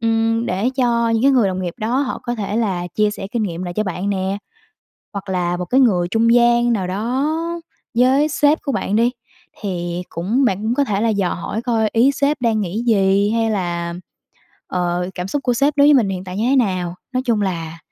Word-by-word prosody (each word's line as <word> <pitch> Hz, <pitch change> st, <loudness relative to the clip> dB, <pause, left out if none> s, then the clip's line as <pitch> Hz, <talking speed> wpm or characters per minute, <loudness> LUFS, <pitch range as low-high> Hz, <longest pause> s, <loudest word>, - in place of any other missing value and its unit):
Ừm, 225 Hz, 0 st, +1 dB
để 195 Hz, +7 st, 0 dB
cho 235 Hz, -3 st, +2 dB
những 225 Hz, +1 st, +1 dB
cái 275 Hz, -, +5 dB
người 235 Hz, -7 st, +3 dB
đồng 185 Hz, 0 st, -3 dB
nghiệp 175 Hz, -2 st, -4 dB
đó 235 Hz, +5 st, 0 dB
họ 275 Hz, -3 st, -3 dB
có 240 Hz, 0 st, -3 dB
thể 210 Hz, -1 st, -3 dB
là 190 Hz, -6 st, -1 dB
chia 210 Hz, -1 st, +2 dB
sẻ 195 Hz, -2 st, -6 dB
kinh 235 Hz, -, 0 dB
nghiệm 180 Hz, -3 st, -3 dB
lại 175 Hz, -1 st, -5 dB
cho 215 Hz, -, 0 dB
bạn 190 Hz, +2 st, -3 dB
nè. 190 Hz, 0 st, -1 dB, 0.8 s
Hoặc 200 Hz, -1 st, -6 dB
là 175 Hz, -1 st, -1 dB
một 180 Hz, -, -3 dB
cái 260 Hz, +9 st, +3 dB
người 185 Hz, -9 st, +3 dB
trung 230 Hz, +4 st, +2 dB
gian 240 Hz, 0 st, +4 dB
nào 190 Hz, -4 st, -1 dB
đó 235 Hz, +9 st, -1 dB, 0.7 s
với 265 Hz, +4 st, +4 dB
sếp 295 Hz, +1 st, +3 dB
của 280 Hz, -, -1 dB
bạn 205 Hz, -, -1 dB
đi, 235 Hz, +3 st, +3 dB, 0.5 s
thì 175 Hz, -3 st, -3 dB
cũng 215 Hz, +11 st, 0 dB
bạn 190 Hz, -6 st, +1 dB
cũng 225 Hz, +2 st, 0 dB
có 285 Hz, -, +3 dB
thể 205 Hz, -6 st, -1 dB
là 230 Hz, -, +2 dB
dò 200 Hz, -4 st, 0 dB
hỏi 215 Hz, +6 st, -4 dB
coi 225 Hz, -3 st, +1 dB
ý 245 Hz, +5 st, +4 dB
sếp 280 Hz, 0 st, 0 dB
đang 225 Hz, -3 st, +1 dB
nghĩ 200 Hz, +5 st, -3 dB
gì 200 Hz, -1 st, +3 dB
hay 225 Hz, 0 st, +1 dB
là, 170 Hz, -4 st, -2 dB, 0.8 s
ờ, 180 Hz, 0 st, -1 dB
cảm 180 Hz, +1 st, -4 dB
xúc 280 Hz, +8 st, -2 dB
của 245 Hz, -2 st, +1 dB
sếp 280 Hz, +5 st, +2 dB
đối 285 Hz, 0 st, +6 dB
với 295 Hz, -, +7 dB
mình 235 Hz, -7 st, +3 dB
hiện 185 Hz, -1 st, -4 dB
tại 185 Hz, 0 st, -7 dB
như 225 Hz, +4 st, 0 dB
thế 275 Hz, -, +3 dB
nào. 185 Hz, -8 st, 0 dB, 0.2 s
Nói 255 Hz, 0 st, 0 dB
chung 225 Hz, -4 st, +1 dB
là 165 Hz, -4 st, -3 dB
215 Hz, 230 wpm, -19 LUFS, 185-240 Hz, 0.8 s, với